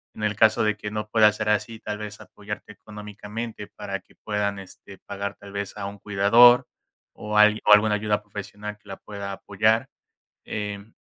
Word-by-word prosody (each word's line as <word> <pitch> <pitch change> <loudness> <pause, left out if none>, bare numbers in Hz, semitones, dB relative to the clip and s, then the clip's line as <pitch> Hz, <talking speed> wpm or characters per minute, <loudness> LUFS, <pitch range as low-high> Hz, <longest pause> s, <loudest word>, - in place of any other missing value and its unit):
En 110 - -7
el 105 -1 0
caso 110 0 +4
de 105 -1 +1
que 105 - -6
no 105 0 -4
pueda 110 -1 +6
ser 105 - -2
así, 110 +1 0
tal 105 0 -4
vez, 105 0 -8
apoyarte 105 +1 -8
económicamente, 105 +1 -8
para 100 -2 -6
que - - -26
puedan, 105 -2 -2
este, 95 0 -13
pagar 100 +1 -6
tal 100 - -13
vez, 100 -1 -5
a 100 -2 -5
un 100 0 -9
cuidador, 115 +5 +6 0.5
o 105 0 -4
algui 105 0 +6
o 105 - +8
alguna 105 0 +5
ayuda 105 0 0
profesional 105 +1 -8
que 105 - -26
la 95 - -6
pueda 100 -1 -7
apoyar. 110 +5 +1 0.6
Em, 105 0 -5
105 Hz, 185 wpm, -25 LUFS, 100-105 Hz, 0.6 s, o